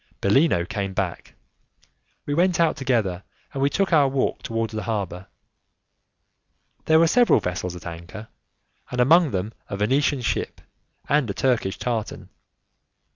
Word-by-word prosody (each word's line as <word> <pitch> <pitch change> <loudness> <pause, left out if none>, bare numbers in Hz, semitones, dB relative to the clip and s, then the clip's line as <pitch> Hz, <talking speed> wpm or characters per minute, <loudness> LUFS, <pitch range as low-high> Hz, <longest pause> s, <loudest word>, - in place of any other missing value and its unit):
Bellino 100 - +3
came 100 -2 -4
back, 95 -4 -4 0.9
we 145 - -2
went 175 +2 +2
out 165 -2 +3
together, 115 - -1 0.3
and 135 - -3
we 140 - +3
took 195 +3 0
our 145 -3 +5
walk 135 0 -1
towards 115 -1 -3
the 110 - -3
harbour. 95 -5 -4 1.6
There 160 - +5
were 165 - +5
several 235 - +4
vessels 90 -1 -4
at 90 - -11
anchor, 85 +6 -9 0.6
and 125 - -4
amongst 160 +4 +5
them 100 +4 -2 0.2
a 100 - -4
Venetian 135 +6 +1
ship 120 - -2 0.5
and 145 -5 +2
a 100 - -3
Turkish 120 -7 0
tartan. 115 -4 -4
115 Hz, 140 wpm, -23 LUFS, 100-145 Hz, 1.6 s, our